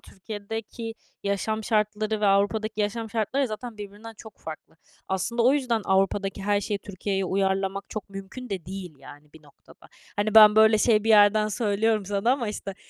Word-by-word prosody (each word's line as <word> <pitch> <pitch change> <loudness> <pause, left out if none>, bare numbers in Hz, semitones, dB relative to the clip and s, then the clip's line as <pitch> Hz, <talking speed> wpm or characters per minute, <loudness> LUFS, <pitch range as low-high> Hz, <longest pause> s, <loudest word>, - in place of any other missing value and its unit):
Türkiye'deki 225 +3 -7 0.3
yaşam 210 +2 -2
şartları 215 0 0
ve 210 - +2
Avrupa'daki 210 +2 +1
yaşam 220 +2 -2
şartları 240 +5 0
zaten 215 +1 -7
birbirinden 210 +2 -9
çok 220 -3 -13
farklı. 160 0 -10 0.3
Aslında 230 +5 -1
o 255 +3 +5
yüzden 250 -6 0
Avrupa'daki 195 +1 0
her 205 0 +1
şeyi 205 0 -3
Türkiye'ye 195 0 -3
uyarlamak 195 +1 -1
çok 215 - -6
mümkün 195 +6 -9
de 190 -4 -4
değil, 185 -3 -7
yani, 145 +2 -15
bir 160 - -16
noktada. 145 -2 -20 0.3
Hani, 205 +1 -1
ben 215 -1 +9
böyle 220 0 +6
şey 215 -2 +3
bir - - -1
yerden 210 0 +5
söylüyorum 215 -1 0
sana 205 +4 +1
ama, 255 -5 -2
işte, 200 -2 -6
210 Hz, 170 wpm, -25 LUFS, 195-220 Hz, 0.3 s, ben